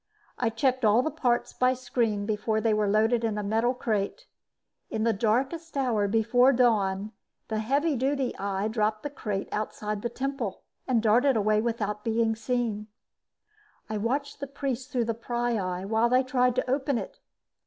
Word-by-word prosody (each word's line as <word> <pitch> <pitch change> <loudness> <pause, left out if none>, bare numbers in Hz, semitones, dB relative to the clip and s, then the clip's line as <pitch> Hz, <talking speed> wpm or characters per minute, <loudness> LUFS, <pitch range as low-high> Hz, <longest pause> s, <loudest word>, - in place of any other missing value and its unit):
I 240 - +2
checked 255 +3 0
all 220 +3 +5
the 315 - -1
parts 240 -2 0
by 255 0 +2
screen 230 -5 -1
before 215 +1 0
they 220 0 +2
were 210 -1 +1
loaded 220 +3 +2
in 220 -2 0
a 210 - -2
metal 225 +5 +1
crate. 225 - -2 0.6
In 220 - -2
the 230 0 +3
darkest 265 +10 -1
hour 230 -7 +1
before 230 +5 +4
dawn, 210 -5 +2 0.4
the 220 -1 -1
heavy 280 +7 +1
duty 265 0 0
eye 200 +1 -1
dropped 215 -1 -1
the 290 - -4
crate 205 -8 -3
outside 210 -1 -3
the 235 - -2
temple 260 -5 -4 0.2
and 240 -4 +2
darted 240 +4 +4
away 215 0 +2
without 210 -3 -2
being 225 0 +1
seen. 220 -2 -2 1.0
I 215 - -1
watched 270 +8 -2
the 280 - -4
priests 270 -2 -4
through 245 -2 0
the 230 - -1
pryeye 225 -6 -2
while 220 +3 +2
they 255 +1 +4
tried 250 -1 +2
to 255 - 0
open 270 0 0
it. - - -6
230 Hz, 170 wpm, -27 LUFS, 215-255 Hz, 1.0 s, all